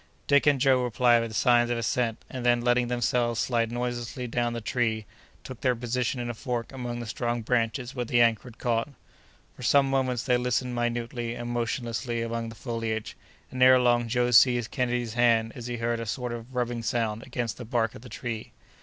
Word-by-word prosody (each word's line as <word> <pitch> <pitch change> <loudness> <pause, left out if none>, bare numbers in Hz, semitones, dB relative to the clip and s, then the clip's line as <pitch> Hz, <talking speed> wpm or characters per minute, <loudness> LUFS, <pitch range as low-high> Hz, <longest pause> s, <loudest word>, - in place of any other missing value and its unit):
Dick 140 +1 +3
and 145 -2 +4
Joe 130 -1 +4
replied 120 0 +3
with 115 -1 -5
signs 120 0 +4
of 120 - 0
assent, 115 0 -1
and 130 -2 -6
then 120 -1 +3
letting 120 0 +2
themselves 120 -1 0
slide 115 -2 0
noiselessly 120 0 -3
toward 120 0 -1
the - - -2
tree, 110 -1 -1 0.4
took 130 - -9
their 125 -2 +2
position 125 +1 -2
in 120 - -3
a 120 - -3
fork 120 0 -4
among 120 -3 -5
the 120 - -5
strong 120 +1 -2
branches 120 +2 -1
where 125 -3 -2
the 120 0 +1
anchor 115 -2 +3
had 120 -2 -12
caught. 115 +2 0 0.7
For - - -13
some 135 +3 +4
moments 130 -3 0
they 125 -2 +2
listened 125 0 -1
minutely 120 0 -2
and 120 0 -5
motionlessly 120 0 -2
among 115 0 -3
the 115 - -10
foliage, 115 -2 -4 0.4
and 130 0 -5
ere 130 0 +8
long 120 -1 +3
Joe 125 +1 +1
seized 120 0 +5
Kenedy's 120 -3 -1
hand 115 -2 +3
as 120 -2 -7
he 120 0 -3
heard 115 0 -1
a 115 - -5
sort 125 +1 -3
of 120 +2 -9
rubbing 120 -1 -1
sound 115 -1 -1
against 120 -3 -4
the 125 - -7
bark 115 -2 0
of - - -11
the 125 - -11
tree. 115 -3 -6
120 Hz, 205 wpm, -27 LUFS, 115-125 Hz, 0.7 s, ere